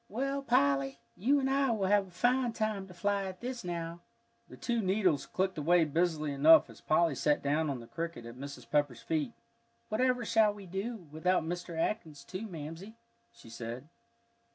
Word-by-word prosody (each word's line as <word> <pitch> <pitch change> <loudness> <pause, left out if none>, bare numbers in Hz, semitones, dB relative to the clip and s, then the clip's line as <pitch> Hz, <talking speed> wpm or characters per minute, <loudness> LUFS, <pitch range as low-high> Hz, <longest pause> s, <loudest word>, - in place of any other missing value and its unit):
"Well, 275 +5 -1
Polly, 140 - +2 0.2
you 275 +9 +3
and 265 - 0
I 270 0 +2
will 215 -4 +1
have 200 0 +3
a - - -15
fine 245 +5 +1
time 215 -4 -2
to 180 - -12
fly 200 +2 0
at 185 -1 -6
this 250 -1 -5
now." 170 -1 -4 0.5
The - - -11
two 235 -2 0
needles 190 -6 +1
clicked 190 -3 -1
away 170 +2 +4
busily 155 -1 0
enough 155 +3 +6
as - - -16
Polly 165 0 +3
sat 145 +2 +1
down 150 +2 +1
on 130 -3 -3
the - - -10
cricket 165 -3 -5
at 120 - -8
Mrs. 140 +2 -8
Pepper's 145 -6 0
feet. 160 - -1 0.6
"Whatever 250 +2 +1
should 220 -2 +4
we 205 -1 -11
do 195 +1 -5
without 180 +4 +1
Mr. 175 0 -4
Atkins, 160 -5 -2
too, 190 +8 -6
Mamsie?" 165 +5 -8 0.4
she 115 - -15
said. 120 +5 -7
175 Hz, 180 wpm, -32 LUFS, 150-215 Hz, 0.6 s, enough